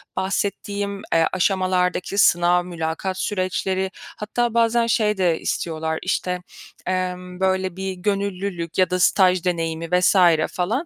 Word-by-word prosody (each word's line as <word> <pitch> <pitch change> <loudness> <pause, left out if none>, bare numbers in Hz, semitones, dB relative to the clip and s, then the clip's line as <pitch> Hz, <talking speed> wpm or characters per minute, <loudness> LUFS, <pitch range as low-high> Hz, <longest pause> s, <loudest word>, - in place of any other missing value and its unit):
bahsettiğim, 200 +1 -2
eee, 165 0 +4
aşamalardaki 185 0 0
sınav, 175 -2 +4
mülakat 170 +2 -3
süreçleri 190 -1 -1 0.3
hatta 230 +2 -1
bazen 230 0 +2
şey 210 -2 +1
de 175 -4 +1
istiyorlar, 160 -1 -2
işte, 180 -1 -1 0.5
emm, 180 -1 -3
böyle, 190 -1 0
bir 190 0 -3
gönüllülük 195 -3 -3
ya 185 -2 +3
da 180 0 -1
staj 185 -1 +4
deneyimi 165 -2 -1
vs. 180 - +3 0.4
falan. 220 - -1
185 Hz, 120 wpm, -22 LUFS, 180-200 Hz, 0.5 s, eee